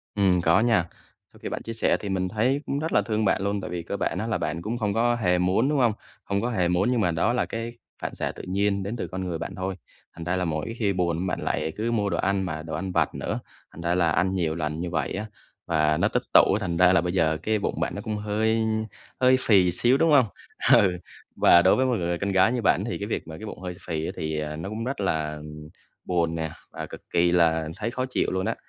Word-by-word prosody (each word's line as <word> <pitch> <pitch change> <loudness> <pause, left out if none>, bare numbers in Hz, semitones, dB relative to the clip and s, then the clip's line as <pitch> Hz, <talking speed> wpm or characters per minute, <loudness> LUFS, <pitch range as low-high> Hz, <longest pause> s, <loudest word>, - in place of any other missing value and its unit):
Ừm, 95 -3 +3
có 85 +2 +4
nha. 110 -7 +3 0.5
Sau - - -17
khi - - -3
bạn - - -4
chia 115 - -5
sẻ 115 - +2
thì 100 - -5
mình 95 -1 -1
thấy 125 +7 +1
cũng 140 - -2
rất 160 +2 -3
là - - +5
thương 110 -2 -1
bạn 95 - +2
luôn 100 0 -1
tại - - -6
vì 85 -1 -4
cơ 100 +4 -4
bản - - -1
á, 110 - -2
là 115 - 0
bạn 85 - -3
cũng 115 +5 -3
không 105 -3 -1
có 120 +1 +2
hề 90 -6 +2
muốn, 95 +9 +2
đúng 145 -2 +1
hông? 120 -3 +4 0.3
Không 100 0 -1
có 120 - -1
hề 90 -7 +1
muốn 90 +7 +2
nhưng 120 -3 +1
mà 90 - +2
đó 85 +9 +1
là 125 - +1
cái 115 +1 -5 0.3
phản - - -4
xạ - - -2
tự - - -10
nhiên 100 +1 0
đến 105 +5 -4
từ - - -4
con 95 0 -5
người 85 -2 -3
bạn 85 - -6
thôi. 95 0 -3 0.4
Thành 85 - -8
ra 90 +2 -1
là 90 -1 0
mỗi 80 +7 -2
khi 100 -4 +1
buồn 90 0 -1
bạn - - -2
lại 80 - -2
cứ 115 +2 -1
mua 105 -3 +1
đồ - - -1
ăn, 100 0 +1
mà 80 -3 -4
đồ 80 -1 -7
ăn 95 +3 -3
vặt - - +1
nữa. - - -3 0.3
Thành 85 - -11
ra 85 +1 +1
là 85 -3 +2
ăn 95 +4 +1
nhiều 80 -3 0
lần 75 -1 -3
như 85 0 -3
vậy 80 -5 -2
á, 105 +3 -3 0.4
và 75 -2 +2
nó - - +3
tích - - -1
tụ - - +7
á, - - +2
thành 85 -3 -2
ra 90 +1 +6
là 85 - +4
bây 90 +1 -2
giờ 80 -3 +2
cái 110 -1 +1
bụng - - -2
bạn - - -1
nó - - -4
cũng 105 -1 -3
hơi 110 +2 0 0.6
hơi 130 0 +5
phì 95 -7 +4
xíu, 120 +8 +3
đúng 165 +1 +3
hông? 135 -5 +6 0.5
Ừ, 90 -3 +5 0.4
và 85 - +6
đối 95 - +5
với 130 - +2
một 125 -2 +1
người 85 0 -1
con 100 +2 -2
gái 95 +4 +4
như 125 -2 -1
bạn 95 -1 +3
thì 120 - -3
cái 100 - -4
việc 110 - -3
mà 80 0 -8
cái 110 - -8
bụng 105 - -8
hơi 90 -1 -5
phì 80 -2 -2
á - - -3
thì, 80 -1 -3
ờ, 75 0 -4
nó 80 +5 -5
cũng 110 +2 -4
rất 130 -3 -3
là, 80 -5 -1
ừm, 75 0 -10 0.4
buồn 85 -2 0
nè 80 -1 -2 0.2
và - - -6
cực - - -10
kỳ 85 0 +3
là 80 -2 +3
thấy 115 +3 -3
khó 130 +1 -2
chịu - - 0
luôn 95 0 -1
á. - - -1
95 Hz, 280 wpm, -25 LUFS, 85-110 Hz, 0.6 s, tụ